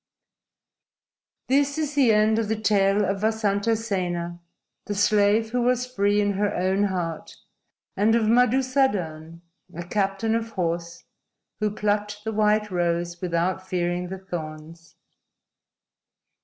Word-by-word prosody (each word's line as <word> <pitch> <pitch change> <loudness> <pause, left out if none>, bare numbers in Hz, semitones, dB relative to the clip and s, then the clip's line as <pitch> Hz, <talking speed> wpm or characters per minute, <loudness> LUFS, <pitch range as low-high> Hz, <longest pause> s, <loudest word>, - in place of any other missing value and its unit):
"_ 265 - +3
_This 285 +1 +2
is 300 -2 -2
the 270 -6 +4
end 215 +1 +3
of 225 - -1
the 220 0 -2
tale 205 -1 +2
of 195 0 -2
Vasantasena, 200 -5 -1 0.5
the 205 - -3
slave 210 +2 +3
who 245 0 0
was 250 0 +1
free 205 -4 +1
in 205 -1 +1
her 205 +1 -1
own 190 +3 +1
heart, 175 -5 -4 0.6
and 215 +3 +3
of 230 - +2
Madusadan, 220 - +1 0.3
a 175 - -5
captain 195 +4 -1
of 230 0 -1
horse, 170 -3 -3 0.6
who 215 0 +1
plucked 210 0 -2
the 220 - -3
white 210 0 +2
rose 175 -1 -1
without 180 +1 -1
fearing 175 0 -1
the 190 - -5
thorns. 165 -2 -8
205 Hz, 130 wpm, -24 LUFS, 175-220 Hz, 0.6 s, the